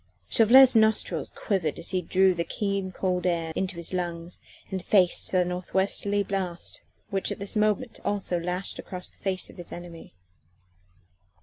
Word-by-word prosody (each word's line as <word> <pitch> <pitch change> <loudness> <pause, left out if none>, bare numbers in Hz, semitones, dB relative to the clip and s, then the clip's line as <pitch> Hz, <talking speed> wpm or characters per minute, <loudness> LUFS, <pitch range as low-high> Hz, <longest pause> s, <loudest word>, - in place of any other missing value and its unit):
Chauvelin's 250 +3 +7
nostrils 220 -1 +2
quivered 180 -8 -1
as 170 - -4
he 185 - +1
drew 185 +2 +3
the 170 -1 -1
keen, 195 0 -2
cold 185 -1 -1
air 165 -2 -1
into 190 -1 -2
his 170 +1 -6
lungs 175 -1 -3 0.3
and 190 -2 -3
faced 185 -4 +2
the 180 -1 +3
north 180 0 -5
westerly 200 +1 +1
blast 185 -3 -4 0.3
which 195 -1 0
at - - -3
this 200 +2 -3
moment 215 +3 +1
also 195 -3 -1
lashed 180 +3 -3
the 180 -2 -7
face 190 -1 -2
of - - -18
his 175 - -8
enemy. 170 - -10
185 Hz, 160 wpm, -27 LUFS, 175-200 Hz, 0.3 s, Chauvelin's